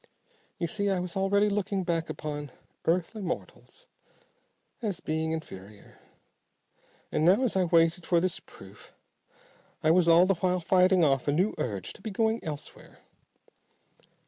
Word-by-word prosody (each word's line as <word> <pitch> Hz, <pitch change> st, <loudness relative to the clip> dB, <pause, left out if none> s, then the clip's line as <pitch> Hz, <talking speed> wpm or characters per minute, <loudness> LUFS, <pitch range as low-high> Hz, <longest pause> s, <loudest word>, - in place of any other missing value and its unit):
You 175 Hz, -, -2 dB
see, 200 Hz, +3 st, -1 dB
I 190 Hz, -2 st, +1 dB
was 180 Hz, -1 st, -5 dB
already 200 Hz, +2 st, +2 dB
looking 200 Hz, -1 st, -1 dB
back 170 Hz, -2 st, -1 dB
upon 150 Hz, -1 st, -5 dB, 0.4 s
earthly 180 Hz, +6 st, 0 dB
mortals 180 Hz, -, -7 dB, 1.0 s
as 205 Hz, -6 st, -2 dB
being 160 Hz, +1 st, -2 dB
inferior, 105 Hz, -10 st, -9 dB, 1.1 s
and -, -, 0 dB
now 190 Hz, +10 st, +5 dB
as 245 Hz, -, 0 dB
I 185 Hz, -1 st, +3 dB
waited 170 Hz, +1 st, +2 dB
for 175 Hz, -, +3 dB
this 185 Hz, +1 st, 0 dB
proof -, -, -16 dB, 0.9 s
I 155 Hz, -, +4 dB
was 175 Hz, 0 st, +4 dB
all 170 Hz, +2 st, +7 dB
the 195 Hz, -, +3 dB
while 180 Hz, +1 st, 0 dB
fighting 185 Hz, +1 st, +3 dB
off 135 Hz, -3 st, +2 dB
a -, -, +3 dB
new 185 Hz, +8 st, +1 dB
urge 100 Hz, -6 st, -3 dB
to -, -, -17 dB
be 220 Hz, -, -5 dB
going 220 Hz, +3 st, 0 dB
elsewhere. 150 Hz, -2 st, -9 dB
175 Hz, 145 wpm, -28 LUFS, 160-195 Hz, 1.1 s, all